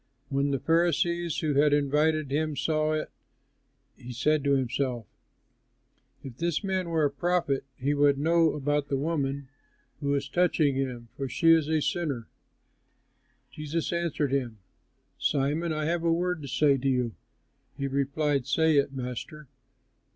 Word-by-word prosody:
When 140 +1 0
the 140 - +1
Pharisee 170 +2 +1
who 155 -2 0
had 150 -1 +3
invited 150 +1 +1
him 155 +1 0
saw 155 -1 +1
it, 155 - -3 0.8
he 125 - -10
said 145 +4 +1
to 140 -1 +3
himself, 125 -2 -1 1.2
"If 130 -3 -9
this 170 +2 -1
man 190 -3 -1
were 160 -2 +2
a 145 - +1
prophet, 165 -3 0
he 140 +3 0
would 145 -1 +3
know 165 +2 +3
about 145 0 -1
the 135 - -1
woman 140 -3 -2 0.5
who 140 0 0
is 140 0 -2
touching 160 -2 +2
him, 125 -3 -3
for 135 -2 -4
she 165 +6 +4
is 160 -2 +4
a 155 -1 +1
sinner." 140 -10 -2 1.2
Jesus 155 +3 -3
answered 165 -5 -1
him, 125 -5 -1 0.6
"Simon, 150 +4 0
I 155 -1 -2
have 170 +1 -1
a 165 - +2
word 175 0 0
to 140 - -7
say 140 +1 +3
to 135 +2 0
you." 125 -3 0 0.6
He 140 - -2
replied, 140 0 0
"Say 160 +1 +3
it, 140 0 +2
Master." 130 +3 -6
145 Hz, 150 wpm, -27 LUFS, 135-160 Hz, 1.2 s, she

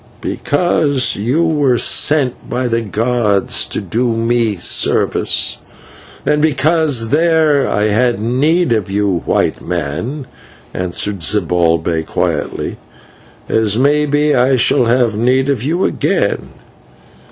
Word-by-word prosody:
"Because 145 -4 0
you 125 +11 0
were 145 -6 +1
sent 140 0 +1
by 125 +1 -2
the 115 -1 0
gods 110 -2 0
to - - -4
do 115 +5 -1
me 115 -2 0
service, 85 - 0 0.7
and 150 0 +1
because 150 -5 +1
there 155 -2 +2
I 105 +1 0
had 120 +1 +1
need 135 +7 +1
of 105 -4 -2
you, 100 -3 -1
White - - 0
Man," 90 - -4 0.5
answered 90 +2 -3
Zibalbay 85 -3 0
quietly, - - -3 0.7
"as 110 -1 +1
may 145 +3 +2
be 145 +1 +1
I 130 +1 +3
shall 120 0 +2
have 120 -2 +1
need 130 +3 +1
of 135 -6 0
you 165 +8 -1
again. - - -1
120 Hz, 120 wpm, -15 LUFS, 105-145 Hz, 0.7 s, I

